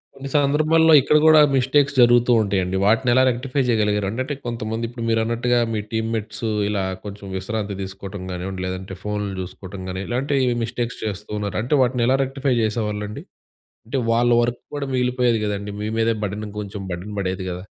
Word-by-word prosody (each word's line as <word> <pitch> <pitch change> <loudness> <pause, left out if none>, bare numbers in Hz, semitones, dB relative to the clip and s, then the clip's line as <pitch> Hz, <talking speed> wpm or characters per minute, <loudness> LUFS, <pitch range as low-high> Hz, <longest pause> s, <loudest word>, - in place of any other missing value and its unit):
కొన్ని 135 0 -7
సందర్భాల్లో 155 +3 +4
ఇక్కడ 150 - +2
గూడా 155 -1 +7
మిస్టేక్స్ 135 +2 +2
జరుగుతూ 120 0 +5
ఉంటయండి. 95 -2 0
వాటినెలా 120 +4 +4
రెక్టిఫై 125 +3 -1
జెయగలిగారు? 105 -3 +1
అంటంటే, 130 +6 -3
కొంతమంది 115 -1 -3
ఇప్పుడు 120 -1 -7
మీరన్నట్టుగా 115 +2 +1
మీ 105 - 0
టీమ్‌మెట్స్ 110 0 -3 0.2
ఇలా 100 -2 -1 0.2
కొంచెం 100 0 -8
విశ్రాంతి 100 +1 -3
తీసుకోటం 95 0 -7
గానివ్వండి, 95 +1 -5
లేదంటే 95 +1 -5
ఫోన్లు 105 -1 -2
జూసుకోటం 95 +1 -8
గానీ, 95 +1 -4
ఇలాంటీ 135 +4 0 0.3
మిస్టేక్స్ 120 0 -3
చేస్తూ 105 0 -5
ఉన్నారు. 100 -1 -3
అంటే, 125 +6 -2
వాటినెలా 125 +1 +2
రెక్టిఫై 135 0 -1
జేసేవాళ్ళండి? 105 -1 -2 0.6
అంటే, 135 +2 -1
వాళ్ళ 120 +1 +3
వర్క్ 120 0 -1 0.2
కూడా 140 -1 -3
మిగిలిపోయేది 125 -2 +1
గదండీ! 100 0 -3
మీ 105 - -2
మీదే 115 0 +2
బర్డెన్, 105 +2 -3
ఇంకొంచెం 100 -1 -6
బర్డెన్ 95 +4 -6
బడేది 95 -1 -2
గదా! 90 +1 -6
110 Hz, 155 wpm, -22 LUFS, 100-125 Hz, 0.6 s, గూడా